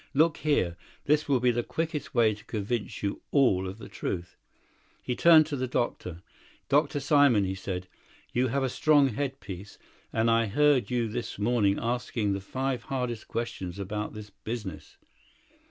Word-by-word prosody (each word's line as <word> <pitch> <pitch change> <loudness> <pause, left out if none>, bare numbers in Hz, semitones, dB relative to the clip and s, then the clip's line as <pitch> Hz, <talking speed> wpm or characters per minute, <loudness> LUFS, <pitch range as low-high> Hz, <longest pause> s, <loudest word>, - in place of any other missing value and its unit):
Look 160 +2 +4
here, 95 - +1 0.3
this 150 +1 +2
will 135 -3 +4
be 125 0 +3
the 120 0 0
quickest 160 +1 -4
way 115 -3 +4
to 105 +1 -12
convince 110 0 -3
you 100 - -2
all 100 -10 +3
of 95 +2 -7
the 115 - -10
truth." 85 -1 -5 0.7
He 125 - -2
turned 160 0 +7
to 150 -1 -4
the 130 -1 -2
doctor. 90 -8 -3 0.5
"Dr. 145 0 +2
Simon," 140 -6 +4
he 95 0 -1
said, 95 -1 -5 0.5
"you 125 +1 +2
have 135 +3 0
a - - +2
strong 145 +1 +4
head 135 +3 -3
piece, 100 0 -9 0.3
and 115 +1 +2
I 115 0 +3
heard 145 +3 +3
you 120 -2 0
this 115 +2 -5
morning 105 -2 +2
asking 115 -3 -1
the 100 - -3
five 130 +4 -2
hardest 125 -4 -3
questions 95 -6 -4
about 105 +2 -4
this 105 -1 -9
business. 105 -1 -7
120 Hz, 170 wpm, -28 LUFS, 100-135 Hz, 0.7 s, turned